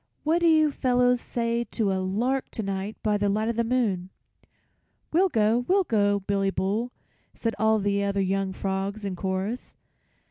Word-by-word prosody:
"What 320 +3 +2
do 340 - +4
you 310 -2 +5
fellows 250 -2 +2
say 235 0 -1
to 215 -4 -1
a 190 - -1
lark 235 +8 -1
to 220 - -3
night 195 +2 -4
by 210 -1 +2
the 205 0 +1
light 215 +3 0
of 235 - -1
the 235 - +1
moon?" 220 -7 0 1.0
"We'll 370 +4 +4
go, 225 -1 +2
we'll 390 +1 +4
go, 205 - +1
Billy 195 0 0
Bull," 210 +6 -1 0.4
said 230 -1 -2
all 220 0 +4
the 200 -1 0
other 200 0 0
young 195 0 0
frogs 195 +2 -3
in 195 -2 -3
chorus. 190 +6 -3
215 Hz, 175 wpm, -26 LUFS, 195-245 Hz, 1.0 s, you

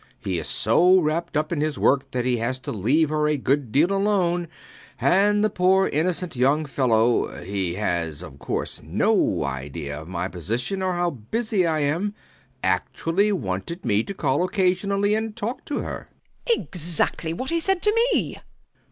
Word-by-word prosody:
He 90 -3 -2
is - - -4
so 185 +2 +4
wrapped 160 -1 -1
up 155 +2 -1
in 160 -4 -1
his 155 -1 -1
work 135 0 +2
that 125 -2 -2
he 125 -1 +1
has 120 +3 -1
to - - -5
leave 135 - +2
her 150 0 +1
a 150 -1 +1
good 135 -2 0
deal 155 - +3
alone; 190 -4 +1 0.5
and 205 +3 +3
the 215 - +3
poor 190 +1 +3
innocent 170 +2 -1
young 140 +5 +2
fellow 120 -4 +1
he 95 -2 -2
has 85 -5 -2
of 70 -5 -11
course 70 - -4
no - - +1
idea 70 +2 -5
of 80 - -11
my 90 0 -3
position 115 - -3
or 185 -1 0
how 175 0 0
busy 185 - -1
I 155 -2 0
am 170 +9 -1 0.5
actually 165 - +1
wanted 110 - -3
me 105 -2 +2
to - - -5
call 145 -1 +1
occasionally 195 +2 +1
and 220 0 -1
talk 230 +2 -4
to 290 - -2
her. - - -6 0.4
WALPOLE. 470 -2 +2
Exactly 165 -1 -1
what 260 - -4
he 335 - +1
said 385 +2 0
to 420 - +3 0.2
me! - - -1
155 Hz, 175 wpm, -24 LUFS, 115-190 Hz, 0.5 s, so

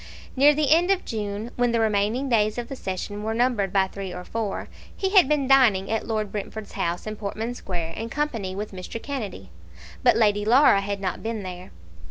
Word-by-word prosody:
Near 285 +2 +6
the 300 -2 +1
end 340 +3 +5
of 390 -1 +1
June, 210 +1 -4
when 245 -1 +2
the 230 - +2
remaining 220 +4 +1
days 215 -3 +2
of 240 -1 -4
the 270 - -5
session 205 -1 -5
were 220 +1 -2
numbered 230 -5 +1
by 195 -1 +3
three 190 0 -7
or 180 - -7
four, 220 0 -3 0.3
he 385 -1 -1
had 380 -8 +6
been 290 -3 +1
dining 235 -9 +4
at 225 - -1
Lord 215 -3 -2
Brentford's 210 +1 -6
house 170 +1 -2
in 215 0 -4
Portman 220 +3 -4
Square 175 -8 -4
in 225 +1 -5
company 230 -11 -2
with 210 +2 -5
Mr. 190 +4 -7
Kennedy. 210 - -6 0.5
But - - +4
Lady 205 -2 +3
Laura 235 -2 +5
had 200 0 -4
not 185 -3 -3
been 225 -2 -4
there. 180 0 -8
215 Hz, 205 wpm, -24 LUFS, 195-245 Hz, 0.5 s, Near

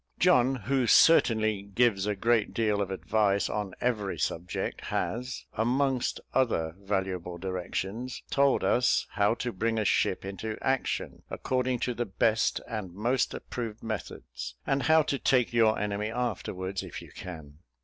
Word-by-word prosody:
John, 135 -7 +4
who 130 +1 0
certainly 110 -9 +5
gives 100 0 +1
a 105 - 0
great 115 +1 +1
deal 105 -3 +1
of 100 - -2
advice 100 +1 +1
on 105 -3 -3
every 110 -6 -1
subject, 85 +2 -3
has, 125 +3 -3
amongst 130 +3 +1
other 85 -11 +1
valuable 95 -3 -2
directions, 95 +6 -4
told 140 -1 +3
us 125 0 +3
how 105 +2 +2
to 120 0 -3
bring 115 +4 -1
a 110 - 0
ship - - +1
into 105 +3 -5
action, 135 -1 -1
according 125 -1 -1
to 125 - 0
the 120 +1 -2
best 110 +3 +1
and 105 -6 -5
most 120 +5 0
approved 115 -3 -6
methods, 65 - -6
and 135 0 +1
how 160 +2 +5
to 140 -2 -2
take 125 -2 +2
your 115 -2 +4
enemy 105 +1 -2
afterwards, 100 -5 -3
if - - -7
you - - -14
can. 80 -5 -9
110 Hz, 150 wpm, -29 LUFS, 95-125 Hz, -, certainly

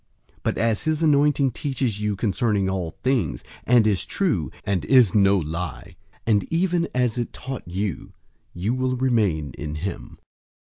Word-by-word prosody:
But - - -1
as 115 +4 0
his 155 0 0
anointing 145 -2 +3
teaches 120 -4 -2
you 105 -1 0
concerning 100 0 0
all 95 -3 -2
things, 110 - 0 0.2
and 120 -2 +5
is 105 -4 +2
true, 105 - -1
and 95 -3 -1
is 125 -8 +5
no 100 -1 +4
lie, 80 -1 -5 0.3
and 105 -4 +3
even 170 0 +1
as 125 -1 +1
it 120 - -3
taught 130 -6 -7
you, 95 -2 -3 0.4
you 95 +7 -2
will 130 0 0
remain 100 - +1
in 75 0 -4
him. 95 +6 -6
110 Hz, 150 wpm, -23 LUFS, 95-130 Hz, 0.4 s, and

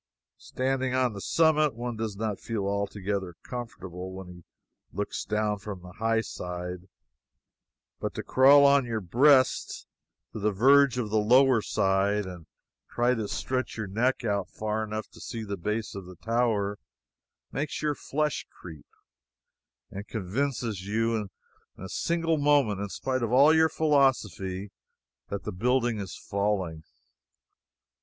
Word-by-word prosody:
Standing 130 0 -1
on 130 -3 +2
the 100 - -7
summit, 155 -2 +3
one 120 0 -4
does 110 -2 -3
not 105 -1 -3
feel 110 -4 -3
altogether 100 -2 -2
comfortable 95 -7 -7
when 95 -1 -8
he 90 -1 -12 0.5
looks 100 +2 -3
down 105 -1 -1
from 100 -3 -7
the 90 - -10
high 115 0 +2
side; 90 -2 -6 1.1
but - - -4
to - - -4
crawl 140 +2 +6
on 140 -1 +5
your 115 -2 -1
breast 130 - +3 0.5
to - - -5
the 105 +1 +1
verge 135 +5 +5
on 115 -4 -2
the 110 +1 +2
lower 125 +2 +5
side 100 +1 +1
and 90 -3 -9 0.4
try 120 +1 +2
to 110 -4 -2
stretch 130 +4 -3
your 110 - -2
neck 120 +7 0
out 100 -3 -1
far 110 0 -2
enough 110 0 -4
to - - -15
see 115 -2 -5
the 100 -1 -4
base 105 +4 -3
of 100 -2 -8
the 90 - -11
tower, 110 -1 0 0.7
makes 150 +2 -3
your 150 -1 +1
flesh 150 +1 -2
creep, 80 -4 -12 1.0
and 100 +2 -7
convinces 110 0 -2
you 110 0 -1 0.5
for - - -11
a - - -5
single 165 - 0
moment 140 -9 +3
in 100 - -3
spite 130 +8 -2
of 115 -1 -1
all 140 +5 +6
your 160 0 +5
philosophy, 105 - +1 0.6
that 100 0 -4
the - - -4
building 120 +3 +1
is 95 -3 -6
falling. 95 -6 -2
110 Hz, 150 wpm, -28 LUFS, 100-130 Hz, 1.1 s, crawl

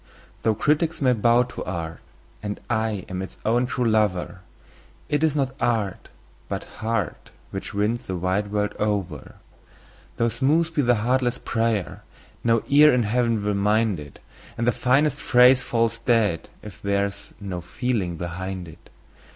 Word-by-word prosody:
Though 110 -1 +2
critics 155 +7 +1
may 130 -3 +3
bow 120 +2 +4
to 125 - -7
art, 85 -3 -5 0.4
and 105 -1 -4
I 110 -4 -1
am 95 0 -4
its 95 - -8
own 120 +3 +2
true 125 -1 -1
lover, 100 -4 +1 0.7
It 145 +1 +1
is 155 -2 +2
not 135 -3 0
art, 110 -5 -1 0.4
but - - -3 0.2
heart, 110 -6 -2 0.2
which - - -6
wins 105 +4 0
the 95 - -2
wide 95 +3 0
world 105 0 0
over. 100 -8 -2 0.8
Though 115 - +2
smooth 150 +8 +1
be 150 - +2
the 120 -2 +3
heartless 125 -1 +1
prayer, 115 -5 -1 0.4
no 115 -1 +2
ear 150 +2 +7
in 125 -1 +2
Heaven 115 -1 +1
will 105 - +1
mind 105 -1 +2
it, 75 -1 -11 0.4
And 115 - -1
the 120 - +4
finest 135 +5 +2
phrase 125 +1 +6
falls 115 -1 0
dead 110 -8 +1
if 105 -2 -11
there 100 0 +1
is 100 0 -8
no 95 -3 -5
feeling 100 -5 -2
behind 90 +2 -5
it. 80 - -15
110 Hz, 160 wpm, -24 LUFS, 100-125 Hz, 0.8 s, ear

